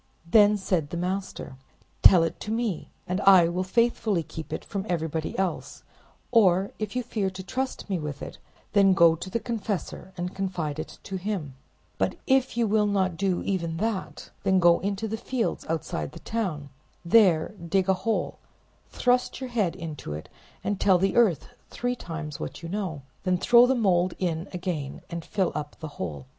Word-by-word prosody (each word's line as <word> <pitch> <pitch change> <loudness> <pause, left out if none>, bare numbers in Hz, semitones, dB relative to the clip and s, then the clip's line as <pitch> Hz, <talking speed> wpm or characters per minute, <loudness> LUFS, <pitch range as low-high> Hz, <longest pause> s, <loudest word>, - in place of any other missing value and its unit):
Then 210 +4 +5
said 180 -6 -1
the 170 - -4
master— 185 -6 -4 0.4
"Tell 175 -3 +8
it 165 - -2
to 215 - -5
me, 225 -7 -2 0.2
and 185 +2 -2
I 190 -4 +7
will 180 +2 -1
faithfully 215 -2 +1
keep 160 -1 -8
it - - -4
from 200 -1 -3
everybody 160 -2 -2
else; 190 -2 -3 0.5
or 195 -5 +4
if 215 +1 -4
you 250 - 0
fear 215 -5 -1
to 190 0 -8
trust 260 +7 -3
me 190 -4 -1
with 150 -2 -5
it, - - -8 0.3
then 195 -2 +5
go 170 -2 +7
to 175 +3 -6
the 230 - -1
confessor 215 -5 -4
and 180 +1 -3
confide 175 -6 -3
it - - -6
to 195 - -4
him; 185 -7 -3 0.5
but - - +1
if 265 -2 +2
you 235 - +3
will 210 0 +2
not 190 -3 +1
do 190 0 0
even 170 -4 -2
that, 215 0 -3
then 190 -1 +3
go 175 -1 +5
into 200 +3 -2
the 220 +1 -3
fields 235 0 -2
outside 110 - -3
the - - -9
town, 175 -11 -3 0.4
there 175 -4 +5
dig 185 +2 +1
a 190 - +5
hole, 220 +4 -2 0.5
thrust 250 0 +1
your 260 -2 -6
head 210 -8 0
into 155 - -6
it, 75 +1 -7 0.3
and 205 -1 -1
tell 190 -2 +5
the 195 +1 +1
earth 220 -8 +3 0.2
three 245 +1 -2
times 165 -8 -6
what - - -6
you 165 - -5
know, 180 -7 -3 0.2
then 185 -1 +1
throw 240 +6 +6
the 265 - +2
mold 185 -6 +2
in 170 -1 -2
again 175 -6 -4
and 170 -1 -4
fill 190 0 0
up 150 -1 -5
the 160 - -5
hole." 75 -7 -4
185 Hz, 185 wpm, -26 LUFS, 165-210 Hz, 0.5 s, Tell